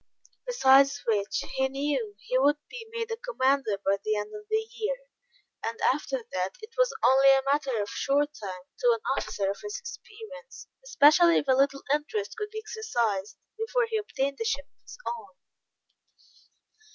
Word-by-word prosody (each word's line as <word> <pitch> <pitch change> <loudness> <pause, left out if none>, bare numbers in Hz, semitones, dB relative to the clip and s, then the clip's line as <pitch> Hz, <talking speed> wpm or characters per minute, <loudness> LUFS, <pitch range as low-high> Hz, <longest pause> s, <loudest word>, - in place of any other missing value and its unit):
Besides 275 - +5
which, 210 -2 0
he 265 0 +3
knew 270 -6 -2
he 250 - -5
would 290 +2 +4
be 460 -3 -8
made 460 0 -4
a 455 - -2
commander 275 - +1
by 195 0 +2
the 215 0 0
end 210 0 -4
of 420 0 -9
the 440 0 +1
year, 480 +3 -1 0.7
and 230 0 -3
after 470 - -4
that, - - -2
it 435 +1 -12
was - - +3
only 270 +1 +6
a 270 0 +5
matter 275 -4 +1
of 205 - -1
short 290 +5 0
time, 190 -8 -7 0.2
to - - +4
an 455 - -9
officer 200 -1 -2
of 200 - -7
his 415 0 -5
experience, 475 +1 -10 0.2
especially 335 -6 +6
if - - -1
a - - +4
little 275 +1 +2
interest 410 +10 -2
could 425 -2 -4
be 435 +1 -6
exercised, 230 - -2 0.2
before 475 +2 +1
he 445 -1 -1
obtained 280 -10 -2
a - - +2
ship 445 -11 -1
of - - -44
his - - -12
own. 475 +1 -6
295 Hz, 175 wpm, -28 LUFS, -, 0.7 s, only